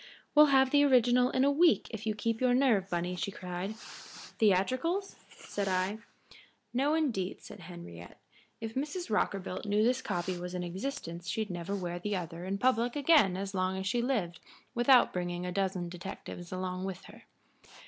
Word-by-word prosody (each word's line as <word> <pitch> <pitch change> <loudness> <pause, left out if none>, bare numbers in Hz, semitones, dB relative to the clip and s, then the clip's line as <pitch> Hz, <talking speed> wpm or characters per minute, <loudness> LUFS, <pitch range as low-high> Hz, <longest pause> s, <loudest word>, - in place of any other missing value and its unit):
"We'll 300 0 +8
have 265 -2 +4
the 290 0 +5
original 250 -2 +4
in 260 - +1
a 285 - +4
week 325 +4 +4
if 220 -1 -6
you 215 - 0
keep 230 +2 -2
your 250 -1 +4
nerve, 230 -8 +3
Bunny," 175 0 -2
she 180 - -2
cried. 185 +2 -5 0.6
"Theatricals?" 255 - +1
said 200 -1 -5
I. 190 +3 0 0.7
"No, 280 +5 +2
indeed," 235 -13 -1
said 205 - -11
Henriette. 170 - -11 0.4
"If 225 0 -5
Mrs. 300 - -3
Rockerbilt 195 -2 -1
knew 205 +1 +2
this 250 +3 +2
copy 180 -6 -3
was 180 +1 -5
in 180 - -2
existence 175 -3 -5
she'd 220 -3 -2
never 175 +3 -3
wear 175 -2 -4
the 210 +3 -2
other 170 -1 -5
in 195 +1 -2
public 245 +1 +1
again 285 - +4
as 195 0 -4
long 185 0 0
as 190 - -4
she 235 +5 +1
lived 210 -10 -1 0.3
without 245 +1 +5
bringing 175 0 -3
a 180 - -3
dozen 190 -2 -1
detectives 175 0 -8
along 185 0 -3
with 190 -1 -5
her. 225 +2 -15
200 Hz, 175 wpm, -31 LUFS, 180-250 Hz, 0.7 s, We'll